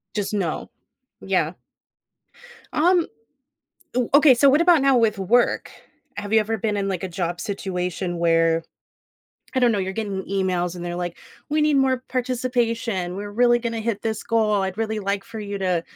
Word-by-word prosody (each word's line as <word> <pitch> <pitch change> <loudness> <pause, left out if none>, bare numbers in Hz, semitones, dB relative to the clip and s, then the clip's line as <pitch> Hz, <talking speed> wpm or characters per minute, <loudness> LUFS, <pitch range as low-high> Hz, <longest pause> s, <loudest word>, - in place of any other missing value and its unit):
Just, 205 -1 -2
no. 190 -6 -2 0.5
Yeah. - - 0 1.2
Um, 345 +2 +3 0.9
ooh, 250 -2 +1
okay, 285 -1 +7
so 275 +3 +5
what 290 +4 +4
about 340 -4 +5
now 275 -2 +4
with 220 -3 +2
work? 235 +6 +2 0.5
Have 205 +1 -4
you 220 - +6
ever 220 +1 -1
been 210 0 -1
in, 195 -1 -1
like, 190 -1 -3
a - - -1
job 175 0 -3
situation 180 -3 -3
where, 165 -1 +2 0.9
I - - +2
don't 245 -2 +4
know, 210 - 0
you're 190 0 -2
getting 200 -3 -3
emails, 185 -2 -1
and 175 - -6
they're 175 0 -4
like, 175 -1 -4 0.3
"We 305 +1 +1
need 300 -1 +3
more 260 -1 +2
participation. 235 -7 -1
We're 205 +1 -5
really 240 +2 +4
gonna 230 -1 -3
hit 220 -2 -2
this 220 -1 -2
goal. 215 -3 +1
I'd 190 0 -3
really 220 -1 -1
like 200 -1 -2
for 230 -1 -8
you 205 -1 -5
to," 180 -3 0
210 Hz, 175 wpm, -23 LUFS, 190-240 Hz, 1.2 s, okay